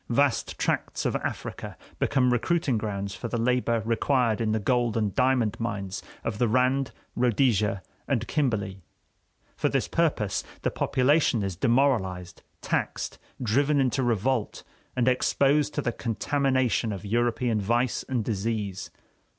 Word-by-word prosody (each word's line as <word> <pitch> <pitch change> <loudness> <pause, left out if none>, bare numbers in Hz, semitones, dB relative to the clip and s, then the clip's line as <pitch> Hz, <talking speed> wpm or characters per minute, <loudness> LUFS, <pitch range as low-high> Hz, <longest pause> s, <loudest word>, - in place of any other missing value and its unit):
Vast 140 +2 +1
tracts - - -1
of - - 0
Africa - - -5 0.2
become 125 -3 +2
recruiting 145 +2 +1
grounds 100 -2 -3
for 120 - -5
the 120 - -2
labor 115 -1 +1
required 115 -1 +1
in 110 -1 +1
the 110 - +1
gold 120 +1 +1
and 105 -3 0
diamond 125 -4 +2
mines 100 -4 -3 0.2
of 105 - -3
the 120 - +3
Rand, 130 +3 +2 0.2
Rhodesia, 115 -5 +2 0.2
and 120 -4 0
Kimberley; 105 -10 -1 0.7
for - - 0
this - - 0
purpose, - - 0 0.2
the - - +1
population 140 -3 +2
is 95 -2 -3
demoralized, 100 -7 +1 0.2
taxed, - - -2 0.2
driven 140 +5 +2
into 130 -1 +1
revolt, 120 0 0 0.3
and 125 -1 +1
exposed 140 +3 +2
to 145 - -1
the 120 - 0
contamination 130 0 0
of 100 0 -6
European 120 0 +1
vice 120 +5 +1
and 120 -5 -1
disease. 105 -3 -2
120 Hz, 135 wpm, -27 LUFS, 105-130 Hz, 0.7 s, the